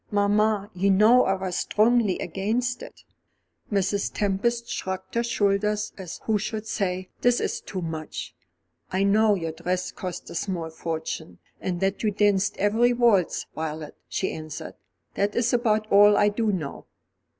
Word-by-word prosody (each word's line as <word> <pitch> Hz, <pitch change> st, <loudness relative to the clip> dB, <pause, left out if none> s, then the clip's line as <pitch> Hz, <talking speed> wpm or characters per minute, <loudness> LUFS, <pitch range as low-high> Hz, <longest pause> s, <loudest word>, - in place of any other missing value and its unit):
"Mamma, 205 Hz, 0 st, +2 dB
you 190 Hz, +2 st, +1 dB
know 215 Hz, +6 st, +6 dB
I 195 Hz, -, +2 dB
was 190 Hz, -1 st, -3 dB
strongly 220 Hz, -3 st, +2 dB
against 225 Hz, +8 st, -2 dB
it." -, -, -11 dB, 0.7 s
Mrs. 200 Hz, 0 st, 0 dB
Tempest 235 Hz, +4 st, 0 dB
shrugged 190 Hz, -5 st, -4 dB
her 235 Hz, -, +2 dB
shoulders 210 Hz, -1 st, 0 dB
as 185 Hz, -4 st, -8 dB
who 215 Hz, -2 st, +1 dB
should 215 Hz, +1 st, -4 dB
say, 185 Hz, -3 st, -2 dB
"This 245 Hz, 0 st, +3 dB
is -, -, -2 dB
too 185 Hz, -3 st, -5 dB
much!" 160 Hz, -1 st, -5 dB, 0.6 s
"I 190 Hz, +1 st, +1 dB
know 210 Hz, +1 st, +4 dB
your 165 Hz, -4 st, -3 dB
dress 180 Hz, +3 st, -2 dB
cost 180 Hz, -2 st, -6 dB
a -, -, -7 dB
small 170 Hz, -2 st, -3 dB
fortune, 160 Hz, -, -5 dB, 0.2 s
and 180 Hz, -1 st, -3 dB
that 195 Hz, +1 st, 0 dB
you 215 Hz, -, +2 dB
danced 205 Hz, 0 st, +2 dB
every 225 Hz, +5 st, +3 dB
waltz, 230 Hz, -7 st, +2 dB
Violet," 155 Hz, -1 st, -5 dB
she 190 Hz, -, -1 dB
answered, 155 Hz, -1 st, -7 dB, 0.4 s
"that 205 Hz, +1 st, 0 dB
is 235 Hz, 0 st, +1 dB
about 220 Hz, -3 st, +2 dB
all 205 Hz, +1 st, +7 dB
I 205 Hz, -, +5 dB
do 215 Hz, +1 st, 0 dB
know." 160 Hz, -8 st, -5 dB
200 Hz, 155 wpm, -25 LUFS, 185-215 Hz, 0.7 s, all